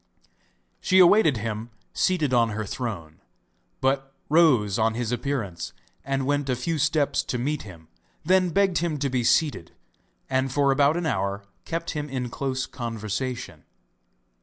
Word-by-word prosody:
She 185 - +2
awaited 180 - +6
him 110 +1 -4 0.2
seated 160 -8 +1
on 115 -2 +4
her 110 - -2
throne, 100 -9 -5 0.6
but 135 0 0 0.2
rose 130 - +4
on 110 0 +2
his 120 -1 -2
appearance, 120 -8 -3 0.3
and 135 0 -1
went 145 0 0
a 125 - +2
few 155 +6 -2
steps 150 0 +2
to 125 - -2
meet 145 +5 -1
him; 85 -6 -12 0.4
then 185 +1 +3
begged 195 0 +2
him 165 -3 -1
to 140 -1 -1
be 125 -2 0
seated, 145 - +1 0.5
and 130 0 0
for 140 +1 +3
about 140 +3 +3
an 175 - -2
hour 100 -9 -1 0.2
kept 165 0 -3
him 150 -1 -4
in 125 -2 -3
close 130 -1 -2
conversation. 115 - -5
135 Hz, 150 wpm, -25 LUFS, 115-150 Hz, 0.6 s, awaited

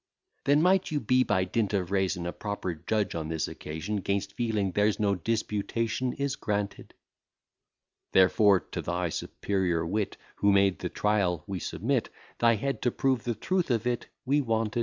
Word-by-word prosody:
Then 145 +2 +4
might 185 +1 +3
you 150 - 0
be, 130 +1 +3
by 95 -5 +1
dint 105 +2 0
of 90 -2 -1
reason, 95 -3 0
A 85 - -3
proper 100 -3 -3
judge 100 +6 -1
on 80 -2 -3
this 80 -1 -1
occasion; 80 +7 -4
'Gainst 100 +1 -2
feeling 110 -6 0
there's 105 +2 +2
no 100 -2 +2
disputation, 115 +4 -1
is 140 -1 -2
granted: 100 -1 -3 1.2
Therefore 95 +1 +5
to - - -6
thy 90 0 -1
superior 90 -1 -1
wit, 100 +4 -2 0.2
Who 100 - +4
made 100 -1 +3
the 90 - -3
trial, 95 -7 +1
we 95 -2 -4
submit; - - -1 0.3
Thy 115 -1 +5
head 135 +6 -2
to 125 - +2
prove 130 -1 0
the 120 -2 -1
truth 180 - 0
of 115 -2 +1
it 125 -1 -1 0.2
we 145 +3 +3
wanted. 115 -2 0
105 Hz, 170 wpm, -28 LUFS, 95-115 Hz, 1.2 s, Therefore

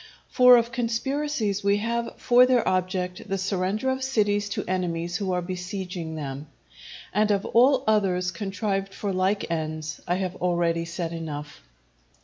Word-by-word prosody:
For 250 -1 +8
of 235 0 0
conspiracies 240 -2 -1
which 200 0 +3
have 235 +1 -2
for 245 +1 +5
their 250 -2 +2
object 185 +1 -1
the 195 - 0
surrender 195 +5 -1
of 260 0 -3
cities 205 -5 +1
to - - -3
enemies 175 -1 -1
who 195 -1 -2
are 180 -1 -1
besieging 180 -2 -5
them, 140 -1 -6 0.7
and 210 +1 +2
of 200 -1 +1
all 260 +3 +4
others 185 -4 +2
contrived 195 +1 -3
for 200 -2 -3
like 185 0 0
ends, 155 -1 -3
I 175 - +1
have 185 -1 -3
already 170 -2 0
said 170 0 -4
enough. 150 -3 -6
190 Hz, 150 wpm, -25 LUFS, 175-215 Hz, 0.7 s, For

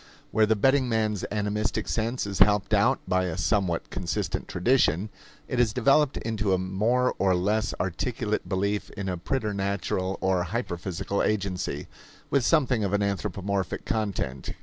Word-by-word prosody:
Where 110 -1 +3
the 110 - +3
betting 130 +4 +3
man's 110 -4 0
animistic 105 +1 -1
sense 115 +2 -1
is 100 -2 -4
helped 105 -1 +4
out - - +4
by 95 0 +2
a 85 -2 -3
somewhat 85 +2 0
consistent - - -2
tradition, 95 - +2 0.4
it 125 - -2
has 115 -4 +3
developed 135 +4 +3
into 105 -3 -1
a - - 0
more 105 +8 +1
or 95 -2 +3
less 105 +5 0
articulate 105 +5 -2
belief 100 +1 -1
in 100 -1 -3
a 90 - -1
preternatural 100 -3 -2
or 95 -2 +1
hyperphysical 95 -2 -3
agency, 95 -8 -1 0.5
with 140 -3 +3
something 130 -7 +2
of 100 -1 -1
an 100 0 +2
anthropomorphic 100 -1 -2
content. 100 - -2
100 Hz, 150 wpm, -27 LUFS, 95-110 Hz, 0.5 s, helped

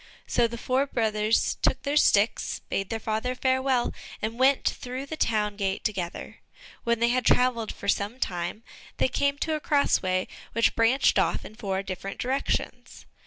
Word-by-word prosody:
So 240 -1 +2
the 235 +1 -7
four 260 +4 0
brothers 220 -3 +1
took - - +1
their 285 +1 -1
sticks, 210 -7 +3
bade 195 -1 -2
their 225 - -2
father 220 +4 -2
farewell, 260 -1 +1 0.3
and 225 +3 -4
went 265 +1 +4
through 255 +2 -3
the 315 - -5
town 210 -7 0
gate 195 -2 -2
together. 185 -4 -4 0.4
When 235 -1 +1
they 235 +1 +3
had 250 +1 +1
travelled 245 -3 +2
about - - -8
for - - -7
some 205 +5 0
time, 180 +3 -3 0.3
they - - +3
came 280 +2 0
to 315 +2 -1
a 310 - -1
cross 290 -1 +2
way 185 0 0 0.3
which 230 0 +2
branched 230 +4 +3
off - - 0
in - - -10
four 195 -3 -3
different 195 +1 -6
directions. 265 +3 -2
230 Hz, 175 wpm, -27 LUFS, 210-260 Hz, 0.4 s, went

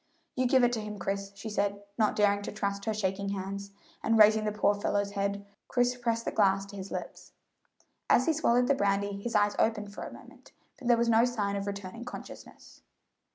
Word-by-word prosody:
"You 255 0 +2
give 260 0 +4
it 245 0 +3
to 225 - -1
him, 210 0 -6
Chris," 195 +1 -3
she 200 +3 -8
said, 200 -1 -1
not 215 -1 +2
daring 205 -1 +3
to - - -5
trust 200 -1 -3
her 220 - 0
shaking 200 -1 -1
hands; 200 0 -4 0.3
and 225 0 +2
raising 215 0 +6
the 210 - 0
poor 205 -1 +2
fellow's 205 0 -1
head, 200 0 -2 0.2
Chris 245 0 +1
pressed 230 -2 -1
the - - -1
glass 195 -2 +2
to 200 - -11
his 195 0 -7
lips. - - -7 0.8
As 255 - +5
he 325 - +3
swallowed 250 -5 +3
the 280 - +3
brandy 200 -3 0
his 235 +2 -4
eyes 205 0 +3
opened 210 -2 0
for - - -8
a - - -7
moment, - - -15 0.3
but 255 - -6
there 240 -1 +5
was 235 0 +1
no 230 0 +5
sign 210 -5 0
of 200 0 -3
returning 200 +3 -6
consciousness. 245 - -11
205 Hz, 210 wpm, -29 LUFS, 200-230 Hz, 0.8 s, raising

